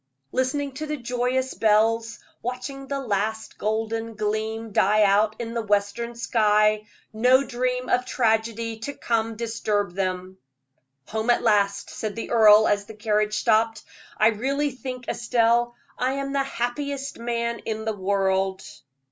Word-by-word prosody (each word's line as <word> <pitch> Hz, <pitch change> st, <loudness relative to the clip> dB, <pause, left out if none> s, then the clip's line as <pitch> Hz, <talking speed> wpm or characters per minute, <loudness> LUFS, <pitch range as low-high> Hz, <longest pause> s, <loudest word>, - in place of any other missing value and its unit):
Listening 275 Hz, +2 st, -1 dB
to 305 Hz, +4 st, -6 dB
the 300 Hz, 0 st, -2 dB
joyous 250 Hz, +1 st, -1 dB
bells, 225 Hz, +1 st, +2 dB, 0.2 s
watching 270 Hz, +3 st, -5 dB
the 280 Hz, 0 st, -2 dB
last 220 Hz, -2 st, -2 dB
golden 225 Hz, +1 st, -2 dB
gleam 220 Hz, +1 st, -2 dB
die 210 Hz, +2 st, +4 dB
out 210 Hz, +2 st, +3 dB
in 230 Hz, -1 st, -5 dB
the 235 Hz, -, -1 dB
western 210 Hz, +3 st, -1 dB
sky, 215 Hz, -2 st, +2 dB, 0.3 s
no 250 Hz, +5 st, +4 dB
dream 250 Hz, -1 st, -2 dB
of 250 Hz, -, +2 dB
tragedy 225 Hz, -2 st, 0 dB
to 285 Hz, +6 st, -5 dB
come 225 Hz, -1 st, -1 dB
disturbed 210 Hz, -4 st, -2 dB
them. 185 Hz, -1 st, -3 dB, 0.7 s
"Home 220 Hz, +2 st, -2 dB
at 240 Hz, -, +3 dB
last," 200 Hz, -2 st, +2 dB
said 215 Hz, -2 st, -4 dB
the 230 Hz, -, -5 dB
earl, 215 Hz, -2 st, +7 dB
as 205 Hz, 0 st, +1 dB
the 220 Hz, -, -11 dB
carriage 210 Hz, 0 st, 0 dB
stopped. 225 Hz, 0 st, +2 dB, 0.3 s
"I 215 Hz, -, +5 dB
really 275 Hz, +6 st, -1 dB
think, 255 Hz, 0 st, -7 dB
Estelle, 235 Hz, 0 st, +1 dB, 0.2 s
I 255 Hz, +1 st, +1 dB
am 275 Hz, 0 st, -3 dB
the 275 Hz, -, +2 dB
happiest 275 Hz, +2 st, -3 dB
man 235 Hz, 0 st, -2 dB
in 220 Hz, 0 st, -4 dB
the 220 Hz, -, 0 dB
world." 190 Hz, -1 st, 0 dB
225 Hz, 145 wpm, -24 LUFS, 215-250 Hz, 0.7 s, earl